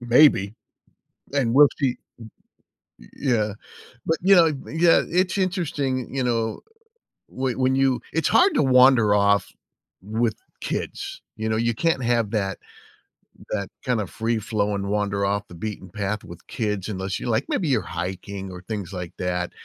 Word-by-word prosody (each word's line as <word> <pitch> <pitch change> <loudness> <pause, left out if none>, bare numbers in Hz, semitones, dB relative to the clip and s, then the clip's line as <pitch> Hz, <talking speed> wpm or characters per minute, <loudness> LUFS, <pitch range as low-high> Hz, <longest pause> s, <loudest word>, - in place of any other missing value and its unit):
maybe, 120 -5 +4 0.8
and 125 -5 +1
will 145 +2 +8
she 135 - +2
m 125 - -4 1.0
y - - -15
yeah. 110 -6 0 0.5
But, 160 -1 +1
you 195 +2 +6
know, 170 -2 +7 0.2
yeah, 165 +1 +4
it's 185 +3 +1
interesting, 150 - -1
y 135 - -5
you 130 - +1
know, 115 -2 -1 0.7
whe 130 -1 -2
when 130 0 +2
you 135 -2 +2
it's 165 - +1
hard 375 +2 +4
to - - +3
wander 125 -5 +5
off 100 -3 +2 0.5
with 110 +2 -1 0.3
kids, - - -4
you 110 0 -3
know? 110 - 0
You 115 0 +1
can't 165 -1 0
have 115 -3 +1
that 100 -3 -1 0.9
that 100 -3 -2 0.2
kind 125 -4 +1
of 100 - -5
free 115 0 -1
flowing 100 -2 -1
wander 100 -1 0
off 100 +1 -1
the - - -13
beaten 100 0 -6
path 100 +2 -3
with 85 0 -12
kids 105 -4 -3
unless 95 -2 -3
you're, - - -4
like, 115 +4 +1
maybe 165 -6 0
you're 120 -5 +2 0.2
hiking 95 +1 -6
or 90 -1 -9
things 100 -5 -4
like 90 -1 -6
that. 90 -1 -2
110 Hz, 165 wpm, -24 LUFS, 100-130 Hz, 1.0 s, will